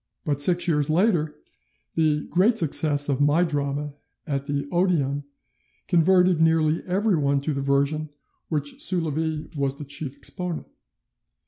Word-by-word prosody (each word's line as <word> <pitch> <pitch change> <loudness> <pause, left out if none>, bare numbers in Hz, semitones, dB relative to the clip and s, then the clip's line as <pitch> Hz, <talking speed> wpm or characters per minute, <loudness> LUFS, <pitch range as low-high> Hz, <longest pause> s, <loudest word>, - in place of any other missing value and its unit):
But 145 -2 +1
six 175 +3 +4
years 150 -3 +1
later 165 -3 +1 0.6
the 155 -2 +1
great 205 +7 +3
success 150 -4 +3
of 140 -1 -1
my 145 +4 +3
drama 145 -2 -3 0.3
at 140 -2 -3
the 140 -1 -2
Odeon 150 -6 0 0.6
converted 180 0 +3
nearly 160 -1 +2
everyone 180 -8 +1
to 150 +2 -2
the 140 - -3
version 140 +2 +1
of 155 - -8 0.4
which 145 -3 -2
Soulavie 160 -2 -2
was 140 -1 -1
the 145 - -8
chief 140 0 -5
exponent. 175 +4 -4
155 Hz, 135 wpm, -24 LUFS, 145-170 Hz, 0.6 s, six